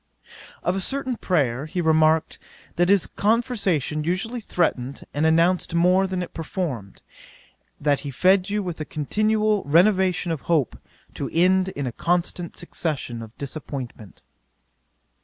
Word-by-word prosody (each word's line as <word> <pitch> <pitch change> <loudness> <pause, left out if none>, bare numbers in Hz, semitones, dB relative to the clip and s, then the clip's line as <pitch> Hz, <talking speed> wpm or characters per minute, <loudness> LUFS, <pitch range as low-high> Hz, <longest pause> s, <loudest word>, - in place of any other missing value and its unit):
'Of 180 - +1
a 195 - -1
certain 265 +2 -2
player 145 - 0
he 180 +3 -4
remarked, 160 -1 +3 0.4
that 175 +1 +2
his 200 -2 +4
conversation 200 - 0
usually 195 +9 -2
threatened 140 - -1
and 150 +2 +2
announced 170 +2 +2
more 180 +3 +4
than 185 -1 -2
it - - -9
performed; 155 - -5 0.8
that 145 -1 +2
he 145 - -6
fed 185 +7 +3
you 205 0 -1
with 175 -4 -5
a - - 0
continual 215 +8 +1
renovation 185 +3 +3
of 160 - -3
hope, 155 -8 +2 0.4
to - - -4
end 185 +2 +3
in 145 -7 -4
a 125 - -2
constant 175 +4 -1
succession 150 -9 -4
of 110 0 -11
disappointment. 130 - -7
170 Hz, 140 wpm, -24 LUFS, 150-190 Hz, 0.8 s, his